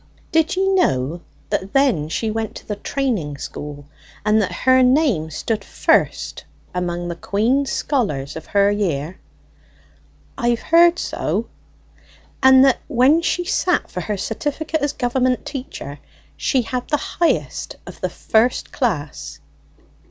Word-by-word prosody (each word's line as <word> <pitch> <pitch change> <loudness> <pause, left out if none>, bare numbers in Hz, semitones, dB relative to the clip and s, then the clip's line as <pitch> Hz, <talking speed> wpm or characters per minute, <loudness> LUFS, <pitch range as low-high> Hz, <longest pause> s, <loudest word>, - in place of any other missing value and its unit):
Did 320 +1 +2
ye 380 +1 +1
know 165 - +1 0.3
that 190 +1 -2
then 250 - +2
she 220 +6 -1
went 220 0 -3
to - - -10
the 210 - -2
training 205 - -2
school, 145 0 -7 0.4
and 215 +1 +4
that 195 - -1
her 260 0 +3
name 250 - +3
stood 210 +7 -2
first - - +1 0.3
among 175 -1 -2
the 170 - -4
Queen's 235 +10 0
scholars 155 - -1
of 160 - -8
her 200 0 +3
year?" 175 -5 -2 1.2
"I've 235 -1 +1
heard 340 +1 +5
so." - - -2 0.9
"And 265 0 +7
that 270 - +3
when 280 +4 +4
she 355 +1 0
sat 360 +1 0
for 180 - -4
her 210 +2 -3
certificate 295 - -2
as 290 -1 +1
Government 250 0 0
teacher, 150 - -7 0.4
she 260 -3 +1
had 250 +2 -4
the 295 - +1
highest 340 +4 -1
of - - -11
the - - 0
first 225 +3 +1
class?" 145 - -3
225 Hz, 135 wpm, -20 LUFS, 175-275 Hz, 1.2 s, And